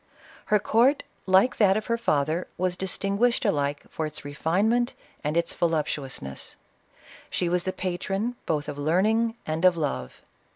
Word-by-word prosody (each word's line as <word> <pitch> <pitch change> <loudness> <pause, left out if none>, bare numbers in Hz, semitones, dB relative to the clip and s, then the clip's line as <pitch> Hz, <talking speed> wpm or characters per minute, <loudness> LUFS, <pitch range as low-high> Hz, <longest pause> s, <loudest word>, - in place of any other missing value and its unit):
Her 210 - +4
court, 235 +7 +3 0.2
like 190 +6 +4
that 200 -2 +5
of 215 - -3
her 230 - +1
father, 160 -6 0
was 180 0 0
distinguished 200 +7 0
alike 145 -7 0
for 160 - -3
its 155 -1 -9
refinement 200 - +1 0.3
and 150 +1 -1
iUi 170 0 +1
voluptuousness. 145 - -2 0.7
She 175 - 0
was 175 +1 +1
the 185 - 0
patron, 195 +6 -2
both 150 -3 0
of 145 -1 -5
learning 215 +9 +2
and 160 +2 -2
of 180 -2 +5
love. 65 - -3
180 Hz, 150 wpm, -26 LUFS, 155-215 Hz, 0.7 s, that